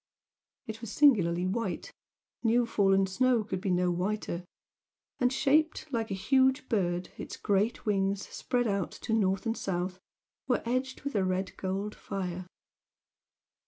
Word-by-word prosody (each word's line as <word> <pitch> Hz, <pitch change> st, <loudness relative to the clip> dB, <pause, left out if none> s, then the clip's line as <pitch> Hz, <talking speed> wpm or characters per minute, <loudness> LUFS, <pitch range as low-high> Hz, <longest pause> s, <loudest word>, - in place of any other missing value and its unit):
It 220 Hz, 0 st, -7 dB
was 230 Hz, -3 st, -6 dB
singularly 185 Hz, -, +4 dB
white, 195 Hz, 0 st, -2 dB, 0.5 s
new 240 Hz, +1 st, +3 dB
fallen 195 Hz, -3 st, +3 dB
snow 240 Hz, +4 st, +2 dB
could 190 Hz, -3 st, -4 dB
be 195 Hz, -, -1 dB
no 180 Hz, 0 st, +2 dB
whiter, 180 Hz, 0 st, -2 dB, 0.8 s
and, 250 Hz, 0 st, +3 dB
shaped 310 Hz, +4 st, +2 dB
like 225 Hz, -1 st, -1 dB
a 195 Hz, -, -1 dB
huge 260 Hz, +6 st, +3 dB
bird, 180 Hz, -5 st, 0 dB
its -, -, -7 dB
great 205 Hz, +3 st, 0 dB
wings 195 Hz, -1 st, 0 dB
spread 245 Hz, -1 st, -1 dB
out 200 Hz, -4 st, 0 dB
to 225 Hz, -, -4 dB
north 195 Hz, -2 st, +1 dB
and 225 Hz, 0 st, 0 dB
south 185 Hz, -2 st, -3 dB, 0.5 s
were 250 Hz, -, +1 dB
edged 255 Hz, +2 st, -1 dB
with 280 Hz, -, -3 dB
a 200 Hz, -, +2 dB
red 185 Hz, +1 st, -1 dB
gold 195 Hz, +2 st, -3 dB
fire. 185 Hz, -2 st, -5 dB
200 Hz, 145 wpm, -30 LUFS, 185-240 Hz, 0.8 s, singularly